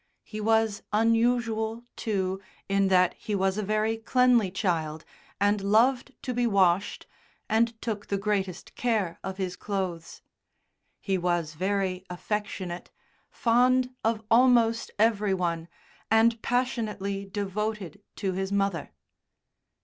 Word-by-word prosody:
He 215 0 -7
was 220 -1 +2
unusual, 225 0 +1
too, 190 -3 -2 0.3
in 195 0 +2
that 185 -1 +4
he 210 - -4
was 195 +1 +1
a - - +1
very 215 +2 0
cleanly 240 -2 +3
child, 165 -5 -2 0.3
and 205 +1 +2
loved 240 +6 +2
to 255 - -2
be 245 0 +1
washed, 195 -2 +2 0.4
and 225 +1 +1
took 210 -3 -3
the 200 - 0
greatest 195 -3 -2
care 210 -8 -1
of 190 0 -5
his 185 -2 -3
clothes. 185 -5 -4 0.8
He 190 -2 0
was 175 -3 -1
very 185 +1 -1
affectionate, 185 -1 -4 0.4
fond 250 +2 +2
of 225 -1 0
almost 230 -1 +4
every 210 -2 +2
one, 170 -2 -2 0.4
and 225 +1 +4
passionately 215 -6 -1
devoted 205 0 -4
to 195 - -2
his 190 +1 -3
mother. 195 -5 -1
205 Hz, 120 wpm, -27 LUFS, 190-225 Hz, 0.8 s, that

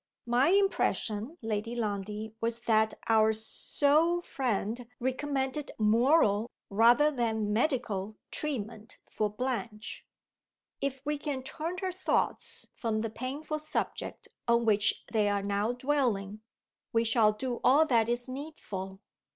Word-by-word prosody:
"My 245 +5 +3
impression, 335 - +1
Lady 225 +1 -2
Lundie, 210 -1 -3
was 230 0 -1
that 220 -2 +2
our 220 -1 +5
so 290 +9 +2
friend 240 - -2
recommended 265 +2 -2
moral, 225 0 +3 0.2
rather 240 +8 +5
than 220 -5 0
medical, 220 -5 -1
treatment 230 -6 -4
for 210 -1 -1
Blanche. 225 -1 -4 0.8
If 270 -1 -2
we 295 0 -1
can 280 -3 -3
turn 330 +6 -4
her 375 - 0
thoughts 370 +1 -1
from 220 -2 -1
the 225 -1 -3
painful 285 +6 -4
subject 305 - -4 0.2
on 235 0 +3
which 210 -2 +2
they 215 -3 +2
are 200 -1 0
now 205 +3 0
dwelling, 245 -7 0 0.5
we 230 0 +3
shall 225 -2 +4
do 240 +3 -4
all 285 +5 +6
that 235 -5 +2
is 240 +1 0
needful. 210 -9 -7
235 Hz, 125 wpm, -30 LUFS, 215-275 Hz, 0.8 s, all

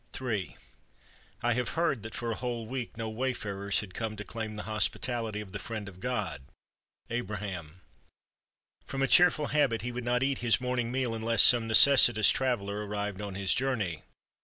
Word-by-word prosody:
Ill 115 -7 -2 1.0
I 120 0 +2
have 125 -1 -2
heard 150 -8 +1
that 110 0 -8
for 120 -1 -3
a - - -2
whole 120 -2 -4
week 125 -1 -6
no 115 -1 -4
wayfarers 110 -4 -2
had 100 -3 -11
come 110 0 -4
to 105 - -7
claim 110 -1 -6
the 105 - -6
hospitality 110 0 -2
of 100 -3 -11
the 100 - -6
Friend 105 +1 -6
of 95 -2 -12
God 105 - -3 0.7
[Abraham]. 95 -7 -5 1.1
From 135 0 -2
a - - +2
cheerful 160 -2 +5
habit 120 -8 +1
he 125 - -3
would 125 0 -5
not 125 +1 0
eat 135 -1 0
his 120 -2 +2
morning 125 -2 -2
meal 130 -2 -1
unless 115 0 +4
some 120 -2 +6
necessitous 115 -2 +7
traveler 105 -6 -2
arrived 105 -1 -4
on 100 -2 -6
his 95 -1 +2
journey. 105 -12 -2
115 Hz, 175 wpm, -29 LUFS, 105-125 Hz, 1.1 s, necessitous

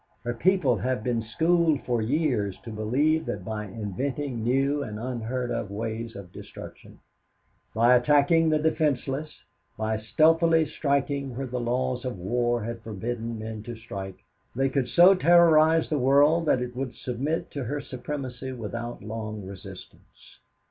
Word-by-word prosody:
Her 120 - -2
people 140 - +2
have 125 -2 -2
been 120 -1 0
schooled 160 +7 +1
for 120 -2 0
years 120 - 0
to 115 - -7
believe 140 +9 +1
that 95 -3 -4
by 110 -1 -4
inventing 115 +6 -4
new 135 +4 +1
and 105 -6 -5
unheard 120 +1 -3
of 115 -3 -3
ways 115 +2 -4
of 95 -3 -10
destruction, - - -11 0.8
by 120 +3 +5
attacking 150 +5 +4
the 155 - +3
defenseless, 150 -2 0 0.5
by 110 0 -1
stealthily 160 - +3
striking 140 -3 -1
where 135 - -2
the 125 0 -4
laws 125 +1 -1
of 125 -5 -4
war 120 +5 0
had 115 +1 -5
forbidden 115 +2 -4
men 110 0 -6
to 120 +2 -7
strike, 100 -4 -8 0.3
they 135 +2 +1
could 135 -2 0
so 175 +8 +7
terrorize 165 -2 +5
the 150 - -1
world 145 +5 +4
that 125 - +3
it 125 0 -7
would 130 -1 -4
submit 135 +6 -3
to 140 -3 -4
her 145 +5 -2
supremacy 130 -1 -6
without 120 0 -6
long 110 -1 -5
resistance. - - -13
125 Hz, 150 wpm, -26 LUFS, 110-145 Hz, 0.8 s, so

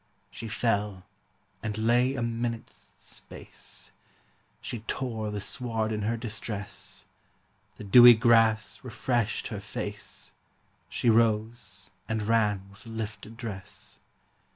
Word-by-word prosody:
She 115 - -7
fell, 105 -3 0 0.6
and 110 -1 -3
lay 120 +4 +3
a 120 - -1
minute's 115 0 -4
space; - - -3 0.7
She 120 - -5
tore 115 -5 -2
the 105 0 -3
sward 115 -1 -1
in 105 -1 -1
her 115 +3 0
distress; 110 -3 -4 0.7
The - - -8
dewy 120 +4 +10
grass 115 -1 +4
refreshed 120 -3 -1
her - - -4
face; - - -5 0.6
She 120 - +2
rose 110 -3 +1 0.2
and 110 -1 0
ran 105 -3 +2
with 100 +3 -15
lifted 110 0 -6
dress. 105 -6 -7
110 Hz, 110 wpm, -28 LUFS, 105-115 Hz, 0.7 s, dewy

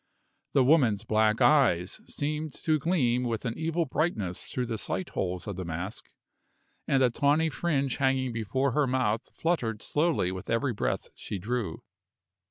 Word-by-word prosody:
The 135 - +5
woman's 125 -8 +4
black 110 0 +2
eyes 95 - +3
seemed 150 +1 -3
to 155 -1 +2
gleam 135 -7 +1
with 115 -1 -2
an 115 - -2
evil 165 +1 0
brightness 115 - -1
through 125 - -2
the 115 -2 -3
sight 185 - -2
holes 90 -1 -3
of 100 -3 -5
the 95 - -3
mask, 85 +4 -5 0.8
and 135 -1 +3
the 125 - +4
tawny 150 +5 +2
fringe 140 -7 0
hanging 130 -2 +1
before 115 +5 0
her 145 +2 +2
mouth 125 -3 0
fluttered 120 -11 -1
slowly 150 - +1
with 95 0 -7
every 115 +3 +1
breath - - -2
she 100 - -5
drew. 105 -2 -3
125 Hz, 160 wpm, -28 LUFS, 105-150 Hz, 0.8 s, The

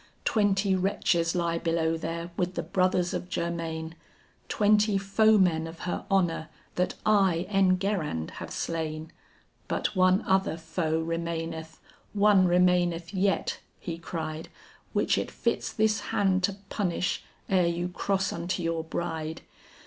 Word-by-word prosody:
Twenty 200 -2 +2
wretches 180 -3 +1
lie 170 -1 0
below 165 -1 +1
there 170 +1 -4
with 180 0 -1
the - - -2
brothers 185 -1 +1
of 180 - -4
Germain, 165 -2 -3 0.6
Twenty 210 -1 +3
foemen 195 -5 +3
of 165 0 -10
her 175 - -3
honor 175 -5 +1 0.2
that 180 - 0
I, 190 -5 +3
Enguerrand, 185 - +1
have - - -6
slain. 160 -1 -3 0.6
"But - - -1
one 185 +2 +4
other 190 -3 +1
foe 160 0 -1
remaineth, 165 -1 -4 0.3
one 200 -2 +5
remaineth 175 -1 +2
yet," 195 0 0 0.2
he 165 -2 -5
cried, 160 -1 -5 0.4
"Which - - +2
it - - -3
fits - - -1
this 220 0 +2
hand 190 -2 +1
to 200 - -2 0.2
punish 180 -3 -1 0.2
ere 185 -3 +3
you 170 +1 -1
cross 195 +2 -1
unto 175 +1 -3
your 165 -1 -1
bride. 160 -1 -4
175 Hz, 130 wpm, -28 LUFS, 165-195 Hz, 0.6 s, one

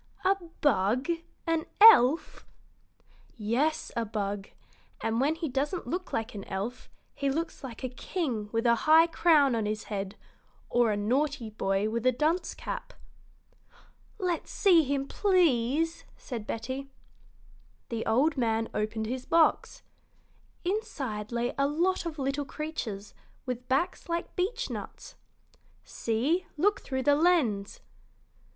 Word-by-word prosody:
"A 385 +1 +5 0.3
bug 240 - +2 0.4
an 330 -1 0
elf?" 330 - +6 0.9
"Yes, 260 +9 0
a 235 - 0
bug; 205 -2 -3 0.5
and 225 +2 0
when 295 +4 +2
he 325 0 -3
doesn't 285 +6 -2
look 360 +2 -4
like 225 +1 -2
an 200 -2 -6
elf, 205 +6 -5 0.2
he 280 - -1
looks 325 +3 -3
like 250 -1 -8
a 255 - -1
king 250 - -3
with 230 0 -1
a 235 - +6 0.2
high 320 +1 +8
crown 315 -5 +4
on 225 -2 0
his 215 0 -3
head 195 0 -3 0.6
or 240 -1 +3
a 210 - 0
naughty 250 +2 0
boy 195 -1 0
with 230 +1 -2
a - - +6
dunce 310 +8 0
cap." - - -6 1.2
"Let's 355 -3 -2
see 360 -5 +5
him, 275 -1 -1
please," 325 - +2
said 230 -5 -7
Betty. 260 +4 -4 1.0
The 230 -2 -2
old 275 +7 +2
man 225 -2 0
opened 215 +1 -2
his 255 +3 -4
box. 330 -1 +2 0.8
Inside 270 - -3
lay 240 +1 -1
a 275 - +3
lot 340 +4 0
of 320 -2 -6
little 275 +1 -1
creatures 235 -10 -5 0.3
with 250 -1 -5
backs 275 +6 -1
like 335 0 -3
beechnuts. 445 +7 -4 0.7
"See, 265 +11 -1
look 405 +7 +2
through 260 -1 -3
the 290 - +5
lens!" 285 - +2
265 Hz, 130 wpm, -29 LUFS, 225-325 Hz, 1.2 s, high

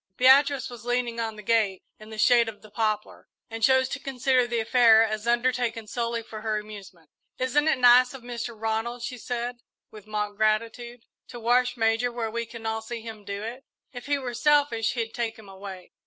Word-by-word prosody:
Beatrice 270 +1 +5
was 240 -1 -10
leaning 245 -1 -1
on 225 -1 -3
the 210 - -10
gate, 215 -4 +1 0.2
in 215 0 -13
the 220 - -9
shade 235 +1 +4
of 215 -1 -12
the 215 - -15
poplar, 215 -1 -2 0.2
and 225 0 -6
chose 260 +2 +4
to 285 - -4
consider 260 -2 +1
the 235 -1 -1
affair 225 -1 +5
as 215 0 -3
undertaken 240 -1 0
solely 235 +1 -3
for 215 -1 -9
her 215 -1 -1
amusement. 200 -6 -10 0.3
"Isn't 270 +4 +1
it 315 - +3
nice 250 +1 +6
of 260 - -11
Mr. 235 -2 -6
Ronald," 225 +2 -2
she 250 0 -5
said, 245 +1 -4 0.3
with 215 -1 -13
mock 210 -1 -3
gratitude, 230 +2 -1 0.2
"to 240 - -9
wash 245 +2 +2
Major 225 +2 +1
where 230 -2 -3
we 235 +1 -3
can 230 -1 -10
all 220 0 -2
see 230 +1 -6
him 220 -2 -9
do 200 +1 -5
it! 245 +4 -7 0.3
If 245 +1 -9
he 285 0 +1
were 255 -3 -5
selfish, 280 -3 +2
he'd 230 -3 -3
take 230 -2 -3
him 220 -2 -14
away." 190 -1 -10
230 Hz, 200 wpm, -26 LUFS, 220-245 Hz, 0.3 s, nice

